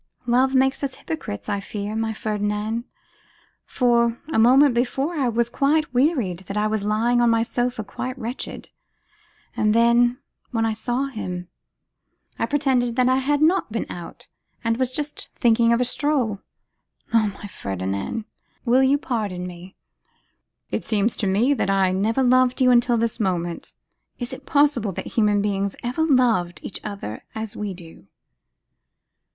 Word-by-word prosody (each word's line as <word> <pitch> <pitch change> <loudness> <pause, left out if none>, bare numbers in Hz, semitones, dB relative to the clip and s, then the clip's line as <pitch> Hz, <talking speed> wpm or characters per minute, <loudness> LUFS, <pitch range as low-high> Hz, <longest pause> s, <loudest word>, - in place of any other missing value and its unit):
'Love 255 +2 +2
makes 265 +2 +2
us 270 -2 -2
hypocrites, 215 -11 -6
I 205 -1 -1
fear, 205 +1 -5
my 225 0 -1
Ferdinand; 215 +1 -2 0.8
for, 235 -2 +2 0.2
a - - +3
moment 260 +4 +6
before, 265 +6 0
I 275 -6 0
was 235 0 0
so 290 +3 +3
wearied 245 - +1
that 200 - -4
I 210 - +2
was 215 -1 0
lying 230 +4 +2
on 240 - +4
my 230 0 +3
sofa 245 -1 -2
quite 255 +5 -5
wretched. 245 +1 -6 0.8
And 215 0 +2
then, 240 +1 +4 0.3
when 225 -2 0
I 225 - 0
saw 240 +4 -1
him, 180 -9 -5 0.9
I - - 0
pretended 260 -5 +1
that 255 0 +3
I 260 - +3
had 290 +3 +1
not 340 - +2
been 225 - -2
out, 175 -1 -9 0.4
and 230 0 +1
was 255 -1 0
just 295 +2 -5
thinking 230 -1 +3
of 235 - +3
a 250 - +2
stroll. 250 -6 0 0.7
Oh, 225 -2 +4
my - - -9
Ferdinand! 100 - -4 0.4
will 250 +2 +4
you 265 +2 +4
pardon 210 -10 -3
me?' 180 +1 -10 1.0
'It - - -2
seems 215 +1 +1
to 205 - -1
me 220 +9 +3
that 230 - -1
I 195 -1 +3
never 220 +7 +1
loved 255 0 +3
you 255 -1 +5
until 240 0 +4
this 230 0 -1
moment. 175 -4 -2 0.4
Is 245 +1 -4
it 260 - -10
possible 280 -9 +2
that - - -5
human 210 -2 +2
beings 200 -1 -1
ever 250 +6 -1
loved 230 - +2
each - - -7
other 200 - -6
as 220 -1 -5
we 205 -3 -4
do? 165 - -14
230 Hz, 160 wpm, -23 LUFS, 205-255 Hz, 1.0 s, moment